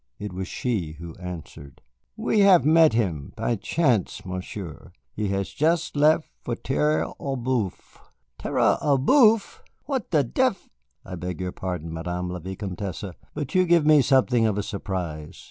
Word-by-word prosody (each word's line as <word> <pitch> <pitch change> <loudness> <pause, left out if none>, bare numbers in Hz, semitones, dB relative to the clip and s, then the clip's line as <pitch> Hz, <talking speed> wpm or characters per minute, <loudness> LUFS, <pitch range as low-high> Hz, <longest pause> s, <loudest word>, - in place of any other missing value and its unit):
It 105 -2 -6
was 95 0 -4
she 95 -11 -2
who 85 +1 -9
answered. 85 -6 -9 0.4
"We 220 -1 +1
have 195 -5 +6
met 160 -2 +6
him 90 -11 -1
by 120 - 0
chance, 115 - 0
Monsieur. 90 -2 -7 0.2
He 105 -1 -2
has 100 0 -2
just 160 - 0
left 155 +2 +4
for 120 - -3
Terre 150 +5 0
aux 135 -1 -3
Bœufs." 120 -6 -3 0.4
"Terre - - +2
aux 145 -2 +3
Bœufs! 220 - +4 0.3
What 265 -7 -3
the 150 -4 +3
dev 230 - -1 0.3
I - - -8
beg 90 0 -5
your 90 -1 -3
pardon, 90 -4 -5
Madame 90 +2 -3
la 90 - -5
Vicomtesse, 95 +1 -5 0.3
but 145 -3 -4
you 185 - +4
give 170 -3 +4
me 150 -1 +6
something 130 -4 +3
of 105 -2 -1
a 105 - -1
surprise. 90 -7 -5
105 Hz, 160 wpm, -25 LUFS, 90-150 Hz, 0.4 s, have